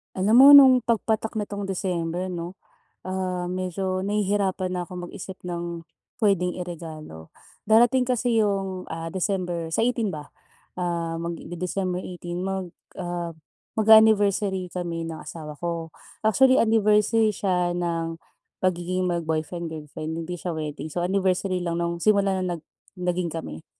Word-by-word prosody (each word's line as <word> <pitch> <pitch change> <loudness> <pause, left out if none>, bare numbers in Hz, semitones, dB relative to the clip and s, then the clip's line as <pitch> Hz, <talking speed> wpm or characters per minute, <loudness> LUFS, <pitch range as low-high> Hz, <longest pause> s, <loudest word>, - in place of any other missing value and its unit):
Alam 200 +4 +3
mo 270 +2 +10
no'ng 260 -3 +8
pagpatak 220 -1 0
nitong 205 -2 -3
December 180 -2 -2
'no, 175 0 -5 0.5
ah, 185 -1 -3
medyo 185 +1 -2
nahihirapan 200 -2 0
na 175 - -3
akong 180 0 -7
mag-isip 190 -1 -9
ng 170 -1 -5 0.4
puwedeng 185 -4 +2
iregalo. 160 - -8 0.3
Darating 240 +4 +5
kasi 245 -2 +1
yung, 195 -3 0
ah, 165 0 -5
December 180 -3 -2
sa - - +2
18 230 -4 0
ba, 150 -1 -7 0.5
ah, 170 -2 -2
mag 170 +1 -3
de 175 - -8
December 180 +1 -2
18 175 0 -5
mag 190 -2 -3 0.2
ah, 175 -2 -4 0.4
mag-a-anniversary 205 -4 +4
kami 170 -2 -4
ng 165 -1 -5
asawa 150 -2 -8
ko. 170 -1 -3 0.3
Actually 255 +5 +5
anniversary 220 0 +3
siya 180 -3 0
nang 165 -1 -2 0.4
pagiging 185 0 0
mag-boyfriend-girlfriend 160 -2 -3
hindi 175 +1 -5
siya 175 0 -4
wedding, 155 -1 -5
so 175 - -1
anniversary 185 0 +1
lang 170 0 -1
no'ng, 170 0 -1
simula 200 +1 +2
no'ng 185 -1 -1
nag 165 - -7 0.4
naging 180 -2 -1
kami. 80 - -7
180 Hz, 135 wpm, -25 LUFS, 170-200 Hz, 0.5 s, mo